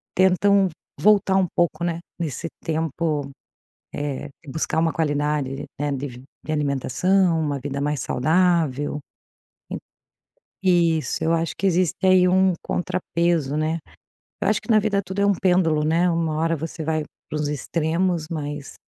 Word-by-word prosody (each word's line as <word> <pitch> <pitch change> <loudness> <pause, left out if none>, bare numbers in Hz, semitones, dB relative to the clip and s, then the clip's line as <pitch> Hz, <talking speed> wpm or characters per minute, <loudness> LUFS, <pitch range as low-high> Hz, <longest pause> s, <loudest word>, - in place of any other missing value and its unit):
tentam 190 +1 +4 0.3
voltar 200 -2 +4
um 190 -1 +3
pouco, 170 -1 +1
né, 170 -1 -1 0.2
nesse 165 -1 -3 0.2
tempo, 155 -2 -1 0.9
eh, - - -7 0.2
e - - -15
buscar 160 +3 -1
uma 165 0 +2
qualidade, 145 -3 -1
né, 145 0 0
de 130 -2 -5 0.2
de 155 - -3
alimentação, 160 +5 +2
uma 145 -3 -1
vida 140 +1 -4
mais 145 -1 -1
saudável. 155 -1 +1 0.7
En - - -3 0.9
isso. 165 -5 +2
Eu 165 - +2
acho 165 0 -1
que 195 - 0
existe 180 -2 +2
aí 185 -1 +6
um 190 +1 +4
contrapeso, 170 -5 -1
né. 155 +2 0 0.6
Eu - - +2
acho - - +2
que, - - -7
na 220 - +6
vida, 205 -1 +1
tudo 190 +2 -4
é - - +4
um 200 - +5
pêndulo, 180 -5 +2
né. 170 +3 +3
Uma 165 -2 0
hora 165 +1 +1
você 160 +1 -5
vai 155 0 0 0.3
para - - -3
os 150 - -1
extremos, 160 +3 -1
mas, 145 -3 -5
165 Hz, 150 wpm, -23 LUFS, 150-180 Hz, 0.9 s, aí